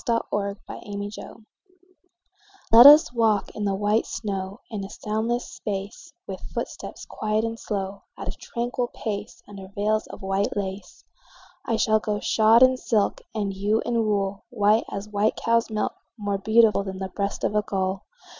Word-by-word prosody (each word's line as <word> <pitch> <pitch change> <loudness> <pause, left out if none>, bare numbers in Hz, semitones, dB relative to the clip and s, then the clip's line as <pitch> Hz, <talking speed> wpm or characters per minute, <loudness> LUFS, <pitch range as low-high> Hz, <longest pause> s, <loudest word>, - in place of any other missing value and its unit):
VELVET 205 -3 -1 0.6
SHOES 220 +1 -10 1.3
Let 235 +4 +11
us 300 -2 +8
walk 225 -3 +2
in 210 - -3
the 195 -1 +1
white 210 +3 +1
snow 195 +1 -4
In 205 -3 -4
a 195 - -7
soundless 220 +4 -2
space; 200 0 -6
With - - -6 0.2
footsteps - - -5
quiet 215 0 -1
and 230 0 -4
slow, 195 -1 -4 0.2
At - - -7
a - - -1
tranquil 245 +1 -3
pace, 205 -2 -5
Under 195 -2 -10
veils 210 +2 -1
of - - -11
white 195 +2 -1
lace. 200 - -5 0.6
I 230 - +1
shall 220 0 +3
go 210 -1 -2
shod 225 +3 +5
in 255 0 +5
silk, 220 -5 0
And 200 -2 -1
you 205 +3 +1
in 235 -1 +1
wool, 200 -1 -1
White 215 -2 +3
as 200 0 -4
a - - -16
white 210 +1 +1
cow's 230 0 +1
milk, 215 -1 -1 0.2
More 205 -2 -2
beautiful 220 +1 +4
Than 190 -1 -6
the 190 0 -4
breast 200 +1 -3
of - - +1
a 210 - +3
gull. 190 -1 -2
210 Hz, 165 wpm, -25 LUFS, 200-225 Hz, 1.3 s, Let